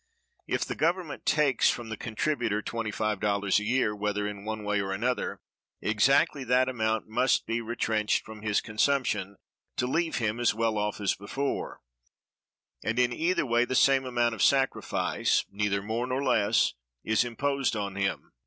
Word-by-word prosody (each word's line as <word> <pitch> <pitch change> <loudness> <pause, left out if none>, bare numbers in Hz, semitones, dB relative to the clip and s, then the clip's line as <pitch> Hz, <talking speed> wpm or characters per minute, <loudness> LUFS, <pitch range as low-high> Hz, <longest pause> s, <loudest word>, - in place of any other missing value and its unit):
If - - 0
the - - -3
Government 170 0 -1
takes 145 -5 +3
from 120 -2 -3
the 110 - -3
contributor 115 -1 -1
[$25] 105 -3 0
a - - -5
year, 105 -2 +1
whether 105 0 -1
in 100 -1 -6
one 110 0 -4
way 105 0 0
or 95 0 -3
another, 120 +6 -2 0.4
exactly 135 +7 +2
that 125 +1 +3
amount 110 -3 -1
must 125 +4 +2
be 115 +1 -1
retrenched 110 -2 0
from 110 -1 -10
his 105 -1 +1
consumption 105 -4 0 0.4
to 125 - +1
leave 165 +6 0
him 110 0 -1
as 120 -3 +2
well 110 -1 0
off 105 0 -2
as 100 -2 +1
before; 135 +8 -4 1.0
and 110 +1 -1
in 125 -1 +3
either 170 +4 +1
way 120 -1 +3
the 130 +1 -2
same 135 0 +4
amount 120 -2 +1
of 110 - -5
sacrifice, 135 -1 +1
neither 100 -1 -1
more 115 +4 -2
nor 130 +2 -1
less, 110 -4 +3 0.3
is 110 +1 +2
imposed 135 +2 -1
on 100 -2 -3
him. 100 0 -2
115 Hz, 160 wpm, -28 LUFS, 105-130 Hz, 1.0 s, same